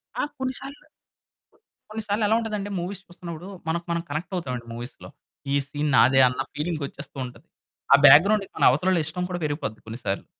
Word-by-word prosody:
ఆ! - - 0
కొన్ని 260 -1 -2
సార్లు 280 +3 -10 1.0
కొన్ని 220 0 -5
సార్లు 205 +2 0
ఎలా 220 - +3
ఉంటదంటే 210 -3 -3
మూవీస్ 190 +2 -5
చూస్తున్నప్పుడు 175 0 -9 0.2
మనకు 170 +1 -1
మనం 170 0 0
కనెక్ట్ 155 +6 -4
అవుతామండి 125 -8 -4
మూవీస్‌లో. 120 +2 -8 0.4
ఈ - - +3
సీన్ 145 +1 -2
నాదే 130 0 +6
అన్న 125 +1 -2
ఫీలింగ్ 155 0 -2
వచ్చేస్తూ 140 0 -10
ఉంటది. 125 - -13 0.5
ఆ - - +12
బ్యాక్ 145 +4 +10
గ్రౌండ్‌కి 205 -1 +1
మన - - -1
అవతల 150 +8 +1
వాళ్ళ 175 -4 +2
ఇష్టం 180 +3 -1
కూడా 180 - -3
పెరిగిపోద్ది 145 -7 -3
కొన్నిసార్లు. 110 -3 -4
170 Hz, 180 wpm, -25 LUFS, 140-195 Hz, 1.0 s, ఆ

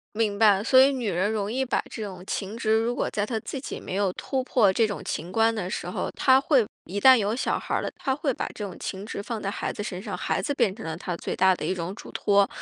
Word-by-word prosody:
明 210 -2 0
白。 205 -3 +5
所 260 +3 +6
以 270 +2 +6
女 245 -6 -2
人 185 +4 0
容 210 -2 -2
易 260 +3 0
把 265 - 0
这 225 - -6
种 185 -3 -7
情 200 +1 -4
执， 220 -1 +1
如 235 +2 0
果 - - -1
在 205 - -1
她 225 0 -2
自 265 - -6
己 - - -6
没 - - -6
有 195 -2 +1
突 265 +6 -2
破 225 -6 +4
这 225 +2 +3
种 205 - -5
情 170 +4 -4
关 225 +1 +3
的 190 -4 -3
时 - - -4
候， - - -3
她 260 -1 +5
会 270 -5 +3 0.2
一 200 +3 -4
旦 260 +3 +8
有 215 -1 0
小 255 - 0
孩 - - -4
儿 - - +1
了， - - -3
她 265 - -1
会 275 0 -1
把 - - -3
这 210 - -5
种 190 -3 -7
情 195 +1 -5
执 200 - -5
放 225 0 -5
在 195 - -1
孩 - - -3
子 - - -5
身 190 -3 -5
上， 200 -3 -4
孩 - - -1
子 - - -1
变 195 -8 +2
成 225 - -9
了 160 0 -4
她 175 -1 -4
最 - - -4
大 190 0 +4
的 - - -6
一 190 - 0
种 175 +2 -4
嘱 - - -11
托。 200 -1 +3
210 Hz, 310 characters per minute, -26 LUFS, 190-235 Hz, 0.2 s, 旦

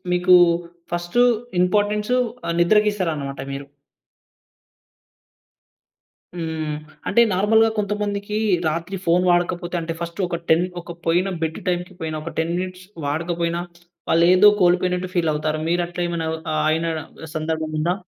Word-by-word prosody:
మీకూ 180 +1 +5 0.6
first 175 +7 +1 0.4
importance 210 +5 +1 0.3
ఆహ్, 170 - -1
నిద్రస్తారనమాట 175 -8 +1
మీరు. 140 0 -6 2.7
హ్మ్. 160 -2 -3 0.3
అంటే, 235 - +4
నార్మల్‌గా 220 +4 +4
కొంతమందికీ 205 0 -2 0.3
రాత్రి 170 +5 -2
ఫోన్ 175 +2 +4
వాడకపోతే, 175 0 0
అంటే, 165 0 -3
ఫస్టు 170 +2 -5
ఒక 170 - -2
10 165 +2 +4 0.2
ఒక 170 0 -9
పోయిన 175 +3 +2
బెడ్డు 160 0 -2
టైమ్‌కి 180 +1 -2
పోయిన, 160 -1 -3
ఒక 165 - -5
10 165 +1 0
మినిట్స్ 185 0 -5 0.2
వాడకపోయినా, 170 +3 -1 0.5
వాళ్ళేఎదో 180 +5 +6
కోల్పోయినట్టు 180 0 +2
ఫీలవుతారు. 155 -2 0
మీరట్లేమైనా 175 -1 -1
అవ్ 160 - -3
ఆహ్, 155 0 0
అయినా 165 +1 0 0.5
సందర్భముందా? 155 +1 -1
175 Hz, 115 wpm, -22 LUFS, 160-185 Hz, 2.7 s, వాళ్ళేఎదో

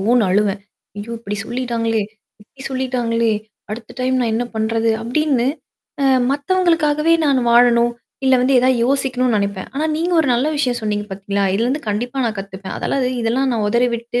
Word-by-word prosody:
ஓன்னு 230 +3 +3
அழுவேன். 200 +1 +1 0.4
"ஐயோ! 215 +3 -6
இப்டி 210 -2 -5
சொல்லிட்டாங்களே 235 -3 -1 0.4
இப்டி 265 +5 -22
சொல்லிட்டாங்களே. 245 -4 0 0.4
அடுத்த 225 +1 -7
டைம் 255 0 +1
நான் 235 -2 0
என்னா 240 +2 -1
பண்றது?" 225 +1 +1
அப்படின்னு, 255 +1 +1 0.6
அ - - +2 0.3
மத்தவங்களுக்காகவே 320 0 +2
நான் 275 -3 +3
வாழணும், 240 0 +5 0.3
இல்ல 265 0 +5
வந்து 260 +2 +2
ஏதாவது 255 -1 +3
யோசிக்கணும்ன்னு 255 -3 +1
நெனைப்பேன். 200 -1 -3
ஆனா 295 +3 -1
நீங்க 340 +3 -1
ஒரு 315 - 0
நல்ல 245 +4 +1
விஷயம் 250 -4 0
சொன்னீங்க 210 -1 -2
பாத்தீங்களா? 200 +1 -2
இதுலருந்து 245 +8 0
கண்டிப்பா 245 +6 -2
நான் 225 -1 -2
கத்துப்பேன். 195 0 -7
அதெல்லாம் 275 - -1
இது 250 - 0
இதெல்லாம் 255 +4 +1
நான் 215 -2 0
உதறிவிட்டு, 235 +1 0
240 Hz, 160 wpm, -19 LUFS, 220-265 Hz, 0.6 s, வாழணும்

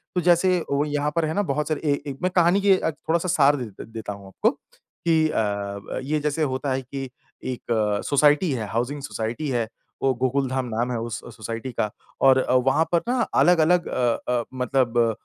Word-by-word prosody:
तो 180 - +2
जैसे 180 +1 +4
वो 140 +1 +2
यहाँ 145 0 -1
पर 165 -1 +2
है 155 - -2
ना 205 - +1
बहुत 150 +2 -1
सारे 155 -2 -2
ए 140 - 0
ए - - -3
मैं 185 - +1
कहानी 175 +2 +4
की 195 -1 +5
अ, 160 - -1
थोड़ा-सा 165 +3 -2
सार 145 -4 +4
देत 120 -8 -7
देता 110 -2 -6
हूँ 100 -1 -12
आपको 95 - +1
कि 160 -2 -2
अ, 100 -4 -2
ये 150 +3 0
जैसे 150 +1 -1
होता 130 -1 -1
है 130 - -1
कि 135 +1 -6 0.3
एक 125 -2 -4 0.4
सोसाइटी 150 +4 +3
है, 115 -5 -3
हाउसिंग 125 +6 -2
सोसाइटी 120 +2 -4
है। 120 -3 0 0.4
वो 135 - +3
गोकुलधाम 130 0 0
नाम 120 +1 -2
है 120 - -1
उस 115 +1 -4 0.2
सोसाइटी 115 +3 -5
का 105 - +1 0.4
और 130 0 +6 0.3
वहाँ 135 +4 +4
पर 170 -1 +3
ना 250 +1 +1 0.2
अलग-अलग 175 0 +4
अ 120 -2 +1 0.2
अ, 120 -1 +1
मतलब 125 -1 0
उ, 115 -1 +4
135 Hz, 195 wpm, -24 LUFS, 120-155 Hz, 0.4 s, और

